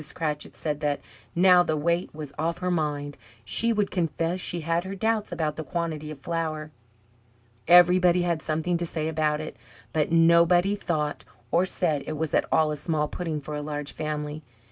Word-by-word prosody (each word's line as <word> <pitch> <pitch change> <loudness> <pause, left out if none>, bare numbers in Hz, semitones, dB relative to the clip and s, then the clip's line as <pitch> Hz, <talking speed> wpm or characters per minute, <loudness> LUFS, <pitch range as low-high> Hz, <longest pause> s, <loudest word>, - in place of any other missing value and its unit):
Cratchit 150 -2 -3
said 150 -2 -2
that, 145 -1 0 0.4
now 180 0 +6
the 155 -3 0
weight 170 +4 0
was 150 -2 -8
off 165 +1 0
her 180 0 -1
mind, 145 -3 -2 0.3
she 230 - +3
would 210 -3 0
confess 170 0 -1
she 175 -1 -3
had 165 +2 0
her 190 +1 -6
doubts 220 +1 0
about 155 -2 -2
the 160 - -3
quantity 155 -1 -3
of 155 - -7
flour. 155 0 -3 1.0
Everybody 180 +1 +6
had 170 -2 0
something 160 +3 -1
to 170 - -2
say 155 -1 -2
about 155 -1 0
it, 155 - -6 0.4
but 155 0 +1
nobody 170 +3 +5
thought 155 -7 -2 0.3
or 180 +2 +3
said 155 -7 0
it 155 - -3
was 160 0 -2
at - - +2
all 155 -1 +3
a 150 - -3
small 150 -1 -1
pudding 160 -1 -3
for 150 +1 -7
a 150 - -3
large 145 -1 -4
family. 150 0 -4
160 Hz, 185 wpm, -26 LUFS, 150-175 Hz, 1.0 s, now